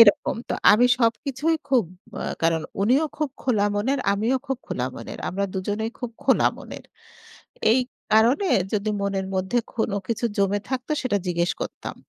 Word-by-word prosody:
এরকম 205 -3 +6
তো - - 0 0.2
আমি 235 +4 +5
সবকিছুই 275 +6 +1
খুব 255 -7 +4 0.4
আ - - -4 0.2
কারণ 165 -1 +2 0.2
উনিও 255 +9 +4
খুব 300 -1 0
খোলা 215 -6 +2
মনের 260 +7 0
আমিও 220 +6 +1
খুব 270 -2 -2
খোলা 125 - -2
মনের। - - -8
আমরা 200 +2 -1
২ - - 0
জনেই 220 +2 -1
খুব 245 -3 -4
খোলা - - +4
মনের। - - -10 0.9
এই 255 - +4 0.3
কারণে 240 - +4 0.3
যদি 210 +1 0
মনের 195 -1 -1
মধ্যে 190 +6 0 0.2
কোন 220 -3 0 0.2
কিছু 230 +1 -1
জমে 200 +1 +2
থাকত 255 -1 -3
সেটা 255 -6 +1
জিজ্ঞেস 170 -1 +1
করতাম। - - -6
220 Hz, 165 wpm, -24 LUFS, 200-260 Hz, 0.9 s, এরকম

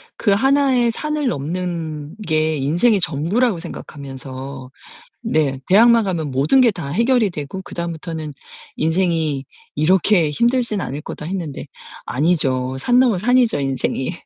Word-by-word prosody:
그 205 - +1
하나의 265 +1 +3
산을 300 +2 -2
넘는 165 - -4
게 155 -1 +1
인생의 175 - +2
전부라고 175 - 0
생각하면서 135 -4 -8 0.5
네. 155 - 0
대학만 230 +3 +6
가면 165 -7 -2
모든 140 - +3
게 235 -3 +5
다 165 -7 -6
해결이 230 - +2
되고 155 +3 -6
그다음부터는 165 -3 -5 0.4
인생이 160 -4 0 0.3
이렇게 180 0 +3
힘들진 235 - +1
않을 140 +4 -5
거다 150 - -8
했는데 170 -6 -5 0.4
아니죠. 130 -3 0
산 245 - +3
넘어 240 -7 +3
산이죠. 240 - +2
인생이. 135 +2 -1
170 Hz, 295 characters per minute, -20 LUFS, 145-220 Hz, 0.5 s, 대학만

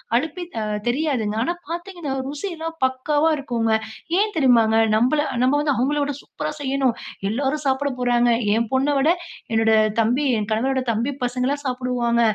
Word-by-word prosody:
அழுப்பே 320 +8 -1 0.2
அ - - -1 0.3
தெரியாதுங்க. 250 -6 0
ஆனா 345 - 0 0.2
பார்த்தீங்கன்னா, 345 -3 -5 0.2
ருசில்லாம் 325 +1 -5
பக்காவா 290 +4 +1
இருக்குங்க. 235 -5 -1 0.5
ஏன் 420 -1 0
தெரியுமாங்க? 235 -6 +4 0.2
நம்மள 255 +7 +2 0.2
நம்ம 260 +2 +3
வந்து 290 -2 +1
அவங்கள 280 +5 +1
விட 285 - -1
சூப்பர்ரா 305 +1 -5
செய்யணும். 270 -2 +1 0.4
எல்லாரும் 275 +6 -1
சாப்பிட 270 +2 +1
போறாங்க. 245 -1 +3 0.3
என் 230 +1 +1
பொண்ணை 270 +3 +2
விட 275 +3 +3 0.4
என்னோட 225 0 +3 0.3
தம்பி 245 +6 +1
என் 210 -1 -2
கணவரோட 260 +4 +1
தம்பி 230 +5 -1
பசங்கள்லாம் 255 +4 -1
சாப்பிடுவாங்க. 250 -2 0
265 Hz, 145 wpm, -22 LUFS, 240-295 Hz, 0.5 s, தெரியுமாங்க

